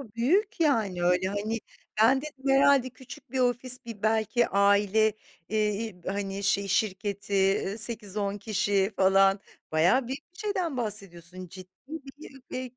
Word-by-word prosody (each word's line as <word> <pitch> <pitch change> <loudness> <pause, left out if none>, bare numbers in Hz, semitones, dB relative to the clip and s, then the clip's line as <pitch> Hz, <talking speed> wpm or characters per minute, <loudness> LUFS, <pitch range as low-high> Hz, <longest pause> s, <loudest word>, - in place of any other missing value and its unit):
Büyük, 355 - +1
yani, 220 - +1
öyle 180 +1 +2
hani, 210 +3 -2 0.4
ben 260 +4 +5
dedim 280 -3 -6
herhâlde 270 -1 +4
küçük 255 -1 -13
bir 260 - -2
ofis 250 0 +1
bir 225 -4 -9
belki 220 +2 +1
bir 235 - +5
aile, 205 +2 +3 0.4
eee, 215 -1 +1 0.2
i 180 -5 -13
hani, 195 0 -3
şey 200 0 +1
şirketi, 200 -1 0
ııı, 200 - -4
8-10 210 -3 -3
kişi 200 -1 0
falan 195 +1 +4 0.3
bayağı 180 +11 +3
büyük 275 +6 -7
bir - - -20
şeyden 370 -9 -2
bahsediyorsun. 185 -5 -6
Ciddi 185 - -10 0.2
bir 255 -3 -8
215 Hz, 140 wpm, -27 LUFS, 195-255 Hz, 0.4 s, ben